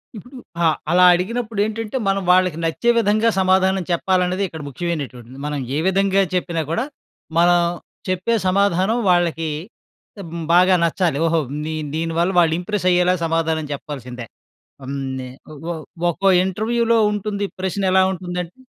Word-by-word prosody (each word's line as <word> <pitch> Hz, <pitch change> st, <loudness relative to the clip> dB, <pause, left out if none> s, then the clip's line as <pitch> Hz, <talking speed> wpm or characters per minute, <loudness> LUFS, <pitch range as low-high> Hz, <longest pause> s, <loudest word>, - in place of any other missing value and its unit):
ఇప్పుడు, 245 Hz, +6 st, -11 dB, 0.3 s
ఆ! -, -, +4 dB, 0.3 s
అలా 180 Hz, +1 st, +6 dB
అడిగినప్పుడేంటంటే 220 Hz, +3 st, -2 dB
మనం 195 Hz, 0 st, +1 dB
వాళ్ళకి 185 Hz, -3 st, +3 dB
నచ్చే 165 Hz, +9 st, 0 dB
విధంగా, 215 Hz, +1 st, +2 dB
సమాధానం 190 Hz, 0 st, +2 dB
చెప్పాలనేది 185 Hz, +2 st, +1 dB
ఇక్కడ 160 Hz, -3 st, -9 dB
ముఖ్యమైనటువంటిది. 135 Hz, -5 st, -5 dB
మనం 150 Hz, -1 st, -2 dB, 0.2 s
ఏ -, -, +1 dB
విధంగా 195 Hz, +1 st, +2 dB
చెప్పినా 170 Hz, -2 st, -1 dB
కూడా, 230 Hz, +9 st, 0 dB, 0.5 s
మనం 175 Hz, +1 st, +5 dB, 0.5 s
చెప్పే 185 Hz, +6 st, 0 dB
సమాధానం 200 Hz, +3 st, +2 dB
వాళ్ళకి, 170 Hz, -2 st, +1 dB, 0.8 s
హ్మ్. 165 Hz, 0 st, -6 dB
బాగా 185 Hz, +1 st, +6 dB
నచ్చాలి. 170 Hz, -3 st, 0 dB
ఓహో! 165 Hz, 0 st, +2 dB, 0.2 s
నీ 160 Hz, -, -3 dB, 0.2 s
దీనివల్ల 165 Hz, +3 st, 0 dB
వాళ్ళు 165 Hz, -2 st, +3 dB
ఇంప్రెస్ 185 Hz, 0 st, -2 dB
అయ్యేలా 180 Hz, +1 st, +3 dB
సమాధానం 160 Hz, -1 st, 0 dB
చెప్పాల్సిందే. 125 Hz, -5 st, -7 dB, 0.6 s
హ్మ్. 140 Hz, +1 st, -4 dB, 0.2 s
నే 130 Hz, -, -6 dB, 0.2 s
ఒ -, -, -9 dB, 0.2 s
ఒ 170 Hz, -, -2 dB, 0.4 s
ఒక్కో 195 Hz, +4 st, 0 dB, 0.2 s
ఇంటర్వ్యూలో 230 Hz, +4 st, +1 dB
ఉంటుంది. 205 Hz, 0 st, -3 dB, 0.2 s
ప్రశ్న 190 Hz, +1 st, -2 dB
ఎలా 190 Hz, 0 st, +5 dB
ఉంటుందంటే 180 Hz, +2 st, -5 dB
180 Hz, 135 wpm, -20 LUFS, 165-195 Hz, 0.8 s, అలా